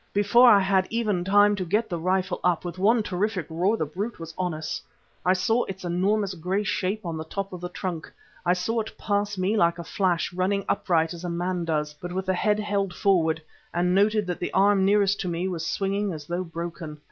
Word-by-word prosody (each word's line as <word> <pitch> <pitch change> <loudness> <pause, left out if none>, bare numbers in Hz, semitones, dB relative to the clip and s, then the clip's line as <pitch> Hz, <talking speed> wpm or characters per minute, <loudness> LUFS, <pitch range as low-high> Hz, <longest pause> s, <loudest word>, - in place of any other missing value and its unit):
Before 235 +5 +6
I 205 - +7
had 190 -1 +2
even 215 -6 0
time 205 +2 +5
to 195 - -3
get 210 +6 0
the 175 -5 -3
rifle 185 +2 0
up, 180 -1 +1
with 175 +1 -6
one 220 +4 +3
terrific 195 -2 -1
roar 185 +7 +1
the 155 - -1
brute 195 +10 -5
was 165 -1 -8
on 180 -1 -1
us. 155 -1 -4 0.4
I 185 - +4
saw 225 +6 +1
its 190 -1 -7
enormous 195 +3 +1
grey 185 +4 -1
shape 195 +2 -2
on 165 -2 -3
the 160 - -4
top 195 +4 -5
of 180 - -7
the 180 - -4
trunk, 175 -3 -5 0.3
I 175 - +3
saw 205 +6 -1
it 220 - -9
pass 205 0 -1
me 190 +4 +1
like 170 -4 +3
a 170 - -6
flash, 175 -1 0
running 190 +2 0
upright 165 -1 +1
as 170 0 -9
a 175 - -3
man 175 0 -2
does, 150 -2 -1
but 175 +4 -8
with 190 +1 -2
the 190 - +1
head 210 +3 +1
held 200 -3 -1
forward, 165 -5 +2 0.3
and 180 +1 +2
noted 210 +2 +3
that 180 -1 -3
the - - -3
arm 200 0 +4
nearest 200 0 +3
to 180 - -3
me 175 +1 -1
was 165 -3 -3
swinging 195 +2 -1
as 150 -2 -8
though 175 +3 -2
broken. 165 -2 -6
185 Hz, 225 wpm, -25 LUFS, 175-205 Hz, 0.4 s, I